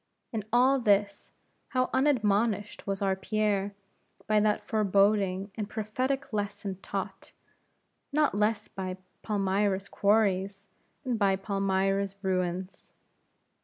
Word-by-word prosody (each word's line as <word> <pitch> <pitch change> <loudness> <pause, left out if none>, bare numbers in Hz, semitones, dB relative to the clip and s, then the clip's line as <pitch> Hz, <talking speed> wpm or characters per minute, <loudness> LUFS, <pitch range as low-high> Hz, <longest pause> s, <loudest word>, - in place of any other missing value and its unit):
In 215 -3 -3
all 255 +3 +4
this, 205 -3 +1 0.4
how 255 0 0
unadmonished 215 -7 +1
was 195 0 -1
our 195 -1 +2
Pierre 205 0 -1 0.5
by 215 -1 +3
that 210 0 +1
foreboding 200 -2 +2
and 210 -1 -4
prophetic 255 +6 -2
lesson 205 -2 -3
taught, - - -5 0.8
not 300 0 +2
less 210 +2 +1
by 185 -1 -5 0.2
Palmyra's 200 -1 0
quarries, 200 -1 +1 0.4
than 250 -4 -1
by 200 -2 +3
Palmyra's 195 0 0
ruins. 185 0 -2
205 Hz, 105 wpm, -29 LUFS, 195-215 Hz, 0.8 s, all